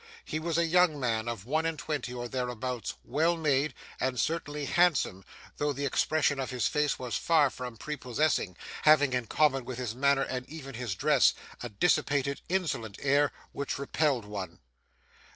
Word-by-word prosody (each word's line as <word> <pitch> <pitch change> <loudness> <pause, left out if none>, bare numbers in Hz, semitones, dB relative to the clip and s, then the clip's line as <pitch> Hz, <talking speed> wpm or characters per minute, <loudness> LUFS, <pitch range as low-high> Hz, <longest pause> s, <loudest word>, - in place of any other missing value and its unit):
He 155 - -3
was 165 0 -1
a 170 - +3
young 170 -2 +3
man 115 -3 0
of 115 -4 -4
one 155 +6 +1
and 165 -1 -1
twenty 150 -4 -3
or 120 -1 -4
thereabouts; 125 -1 -3
well 165 +6 +1
made, 145 -3 +1 0.2
and 130 -2 -1
certainly 150 0 -1
handsome, 150 - +2 0.3
though 145 0 0
the 140 +1 -3
expression 145 +1 +1
of 130 - -2
his 125 -2 0
face 150 -1 +1
was 125 -4 -4
far 155 -5 +3
from 125 -2 -7
prepossessing, 130 - -1 0.2
having 145 -3 +5
in 125 -2 -1
common 135 -1 +2
with 125 0 -6
his 125 -4 -3
manner 140 +2 +3
and 125 -1 -4
even 145 -3 -8
his 120 -4 -3
dress, - - +4 0.3
a 120 - -4
dissipated, 140 - +1
insolent 155 - -1
air 140 +1 +3 0.2
which 140 - -3
repelled 140 -3 0
one. 100 -2 -6
140 Hz, 170 wpm, -29 LUFS, 125-155 Hz, 0.3 s, having